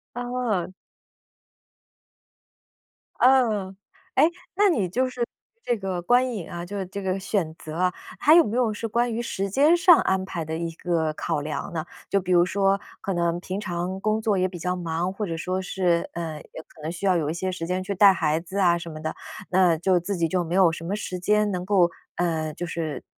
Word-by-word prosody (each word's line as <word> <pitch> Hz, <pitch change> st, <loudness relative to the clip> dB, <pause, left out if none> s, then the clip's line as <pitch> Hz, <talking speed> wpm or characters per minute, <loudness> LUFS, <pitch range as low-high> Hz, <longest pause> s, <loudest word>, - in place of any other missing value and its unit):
哦。 245 Hz, -7 st, -2 dB, 2.5 s
嗯， 225 Hz, -7 st, +3 dB, 0.4 s
诶， 320 Hz, -, +5 dB, 0.3 s
那 410 Hz, +1 st, +4 dB
你 215 Hz, -, +1 dB
就 255 Hz, +8 st, 0 dB
是 245 Hz, -1 st, -2 dB, 0.4 s
这 240 Hz, -, +1 dB
个 190 Hz, -3 st, -3 dB
观 245 Hz, +6 st, +3 dB
影 195 Hz, -7 st, -6 dB
啊， 170 Hz, 0 st, -5 dB
就 200 Hz, +1 st, -4 dB
这 195 Hz, +2 st, -6 dB
个 190 Hz, 0 st, -1 dB
选 190 Hz, -5 st, -1 dB
择 155 Hz, -1 st, -9 dB
啊， 180 Hz, +1 st, +1 dB, 0.3 s
还 305 Hz, -, +6 dB
有 340 Hz, -, +8 dB
没 215 Hz, -, -3 dB
有 240 Hz, -3 st, +2 dB
是 225 Hz, +2 st, -4 dB
关 235 Hz, +2 st, 0 dB
于 230 Hz, -, -2 dB
时 195 Hz, -4 st, -3 dB
间 290 Hz, -, +5 dB
上 345 Hz, -1 st, +7 dB
安 190 Hz, 0 st, +1 dB
排 170 Hz, -3 st, -4 dB
的 160 Hz, +1 st, -3 dB
一 170 Hz, 0 st, -3 dB
个 165 Hz, -2 st, -1 dB
考 150 Hz, -, -2 dB
量 150 Hz, +3 st, -4 dB
呢？ 160 Hz, -1 st, -3 dB, 0.2 s
就 200 Hz, -, +2 dB
比 185 Hz, 0 st, -3 dB
如 175 Hz, -1 st, +5 dB
说， 195 Hz, +1 st, +2 dB, 0.2 s
可 195 Hz, -, -2 dB
能 170 Hz, -1 st, 0 dB
平 185 Hz, +2 st, -4 dB
常 185 Hz, -1 st, -3 dB
工 215 Hz, +2 st, 0 dB
作 215 Hz, -2 st, +1 dB
也 185 Hz, 0 st, +2 dB
比 180 Hz, -1 st, -8 dB
较 180 Hz, +2 st, -2 dB
忙， 170 Hz, 0 st, -2 dB
或 210 Hz, +2 st, -3 dB
者 165 Hz, -, -3 dB
说 185 Hz, +3 st, -2 dB
是， 180 Hz, -2 st, 0 dB
呃， 165 Hz, -2 st, -4 dB, 0.2 s
也 -, -, -7 dB
可 155 Hz, -, -18 dB
能 155 Hz, +2 st, -3 dB
需 175 Hz, +3 st, -5 dB
要 185 Hz, -2 st, +4 dB
有 150 Hz, -3 st, -1 dB
一 -, -, -1 dB
些 185 Hz, +2 st, -2 dB
时 165 Hz, -2 st, -5 dB
间 185 Hz, +1 st, -1 dB
去 200 Hz, -, -3 dB
带 195 Hz, 0 st, +7 dB
孩 160 Hz, -3 st, +1 dB
子 180 Hz, +4 st, -7 dB
啊 175 Hz, -3 st, +4 dB
什 170 Hz, 0 st, -7 dB
么 155 Hz, -1 st, -8 dB
的， 155 Hz, 0 st, -3 dB, 0.4 s
那 180 Hz, -3 st, +4 dB
就 180 Hz, +2 st, +2 dB
自 195 Hz, +4 st, -3 dB
己 170 Hz, -2 st, +1 dB
就 180 Hz, +2 st, 0 dB
没 170 Hz, +2 st, -2 dB
有 185 Hz, -3 st, +5 dB
什 165 Hz, -, -7 dB
么 190 Hz, +4 st, -1 dB
时 185 Hz, -3 st, -5 dB
间 210 Hz, +3 st, +2 dB
能 180 Hz, -1 st, -3 dB
够， 185 Hz, -3 st, +4 dB, 0.3 s
呃， 160 Hz, -3 st, -1 dB
就 175 Hz, -, -5 dB
是 160 Hz, -3 st, -4 dB
185 Hz, 230 characters per minute, -25 LUFS, 170-205 Hz, 2.5 s, 有